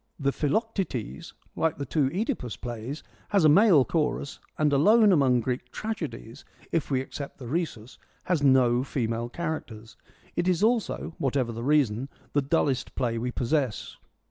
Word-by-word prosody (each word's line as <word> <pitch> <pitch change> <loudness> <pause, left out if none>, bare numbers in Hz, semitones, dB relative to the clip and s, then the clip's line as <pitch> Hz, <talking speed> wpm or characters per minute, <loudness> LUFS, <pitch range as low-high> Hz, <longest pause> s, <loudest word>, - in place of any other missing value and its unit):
The 140 -1 +1
Philoc 220 - -1
tetes, 120 - -4 0.2
like 160 -2 0
the 140 - -4
two 140 -1 +1
CEdipus 190 - -3
plays, 120 +4 -6 0.3
has 200 -6 +3
a - - +7
male 170 - +6
chorus 150 -3 -1 0.2
and 150 -1 +2
alone 210 +9 +5
among 130 -7 +4
Greek 125 +1 -3
tragedies, 160 - -6 0.3
if 165 - -1
we 130 -2 +1
except 140 +1 -7
the 130 - -9
Rhesus, 130 -6 -4 0.2
has 175 -5 0
no 130 -3 +4
female 120 -3 -2
characters. 125 -8 -6 0.4
It 175 - 0
is 180 +1 +2
also, 225 -7 0
what 135 0 0
ever 125 -3 0
the 115 0 -6
reason, 135 -3 +2 0.2
the 145 - +3
dullest 140 -2 0
play 115 -2 -1
we 125 +2 -2
possess. 125 -1 -1
140 Hz, 160 wpm, -27 LUFS, 125-165 Hz, 0.4 s, a